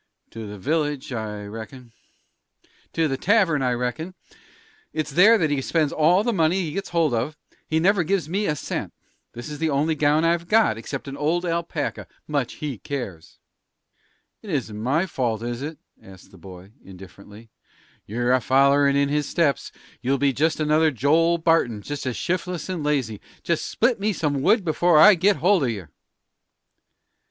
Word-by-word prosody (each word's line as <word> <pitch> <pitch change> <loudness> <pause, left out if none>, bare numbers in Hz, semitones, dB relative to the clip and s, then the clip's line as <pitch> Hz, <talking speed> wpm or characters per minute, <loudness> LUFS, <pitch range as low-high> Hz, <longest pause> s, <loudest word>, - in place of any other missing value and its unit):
"To 115 -1 -7
the 105 0 -8
village, 145 - -2
I 105 -2 -5
reckon." 115 +4 -9 1.0
"To 165 -1 +1
the 135 -2 -2
tavern, 185 -5 +2
I 125 -1 +1
reckon. 125 +9 -4 0.8
It's 155 -1 -3
there 200 +10 +6
that 160 -7 0
he 140 -2 0
spends 155 +1 0
all 175 +6 +3
the 240 +1 0
money 170 0 +2
he 165 -4 -3
gets 195 +6 -4
hold 165 -5 +1
of; 130 +7 -2 0.3
he 160 - +1
never 190 +2 +3
gives 180 -1 -1
me 200 +5 -1
a 150 - 0
cent. - - -5 0.4
This 120 +1 -8
is 150 -1 -7
the 160 0 0
only 150 +3 +1
gown 150 +1 +2
I've 170 0 +1
got, 215 - +3
except 135 +5 -7
an 135 - -6
old 165 +5 0
alpaca. 170 -3 -3 0.2
Much 140 -5 -2
he 140 -8 -6
cares!" 100 - -7 1.0
"It 215 - -11
isn't 130 - -2
my 140 +10 +1
fault, 120 - -2
is 120 +1 -4
it?" 150 +2 -6 0.2
asked 95 -1 -15
the 95 - -16
boy, 95 +2 -12
indifferently. 100 +4 -14 0.6
"You're 120 +4 -1
a 130 - +3
follerin' 140 +2 +3
in 140 0 +2
his 145 0 -1
steps. 150 -7 0 0.3
You'll 135 +2 +1
be 140 0 +1
just 155 +5 0
another 155 +1 +3
Joel 155 +6 +2
Barton 160 -11 +1
just 145 -2 -5
as 125 - -3
shif'less 180 -1 -3
and 180 -5 -3
lazy. 130 -8 -1 0.2
Just 170 -2 -1
split 235 0 +1
me 210 +1 0
some 145 -5 -1
wood 200 - +3
before 170 +1 +3
I 210 +7 +9
get 195 +3 +3
hold 185 -2 +2
of 125 - +1
yer!" 95 -9 -6
150 Hz, 175 wpm, -23 LUFS, 125-170 Hz, 1.0 s, I